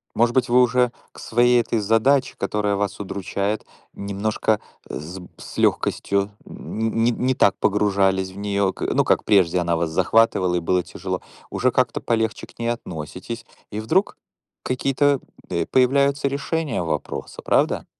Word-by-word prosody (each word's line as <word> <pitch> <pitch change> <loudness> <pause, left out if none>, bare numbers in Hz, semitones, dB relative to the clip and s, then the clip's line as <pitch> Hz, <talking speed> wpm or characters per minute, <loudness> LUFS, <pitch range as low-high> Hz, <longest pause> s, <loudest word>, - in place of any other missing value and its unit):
Может 120 +2 +2
быть, 125 -1 +3
вы 125 +1 +5
уже 125 0 +3 0.2
к - - -18
своей 120 +1 +3
этой 115 -1 0
задаче, 115 +6 +2
которая 105 0 0
вас 100 0 -2
удручает, 100 +1 -3 0.3
немножко 105 +2 -1 0.3
с 85 +5 -7
б 90 - -10
с - - -11
лёгкостью 100 0 +1 0.2
н 110 0 -4
не 120 - +4
не 125 +2 0
так 100 -5 +3
погружались 95 -2 +2
в 95 - -13
неё, 100 -1 0
к - - -14
ну, - - +3
как - - +2
прежде 95 -4 +4
она 85 -1 +1
вас 80 0 -1
захватывала, 95 +1 +3
и - - +2
было 90 +2 +1
тяжело. - - -5 0.3
Уже 125 0 +1
как-то 125 -2 +1
полегче 110 -1 -1
к - - -22
ней 115 - -2
относитесь, 105 +2 -6 0.3
и 105 - -4
вдруг 150 - +1 0.4
какие-то, 135 +2 +1 0.3
э, 85 -2 -1
появляются 140 +2 +2
решения 140 - -2
вопроса, 80 - -4
правда? - - +1
110 Hz, 155 wpm, -22 LUFS, 95-125 Hz, 0.4 s, вы